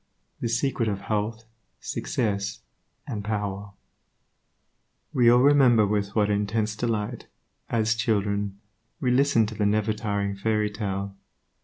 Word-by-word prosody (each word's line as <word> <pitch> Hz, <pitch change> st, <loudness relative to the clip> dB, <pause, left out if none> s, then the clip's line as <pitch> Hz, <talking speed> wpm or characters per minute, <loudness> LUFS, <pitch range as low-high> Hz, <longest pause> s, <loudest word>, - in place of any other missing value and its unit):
The 120 Hz, -, -2 dB
secret 115 Hz, -1 st, 0 dB
of 100 Hz, -1 st, -3 dB
health, 110 Hz, +1 st, -2 dB, 0.4 s
success 105 Hz, -2 st, -2 dB, 0.4 s
and 105 Hz, -2 st, -4 dB
power 100 Hz, -1 st, -3 dB, 1.4 s
We 120 Hz, -2 st, +5 dB
all 120 Hz, +1 st, +6 dB
remember 130 Hz, -6 st, +6 dB
with 100 Hz, 0 st, -1 dB
what 105 Hz, -2 st, +3 dB
intense 105 Hz, +1 st, 0 dB
delight, 110 Hz, -2 st, -2 dB, 0.4 s
as 110 Hz, -1 st, +2 dB
children, 105 Hz, -3 st, -1 dB, 0.4 s
we 125 Hz, -, +1 dB
listened 125 Hz, -4 st, +3 dB
to 110 Hz, -, -8 dB
the 105 Hz, -, 0 dB
nevertiring 105 Hz, -1 st, -1 dB
fairy 105 Hz, 0 st, +1 dB
tale. 100 Hz, -1 st, -4 dB
105 Hz, 120 wpm, -26 LUFS, 100-115 Hz, 1.4 s, all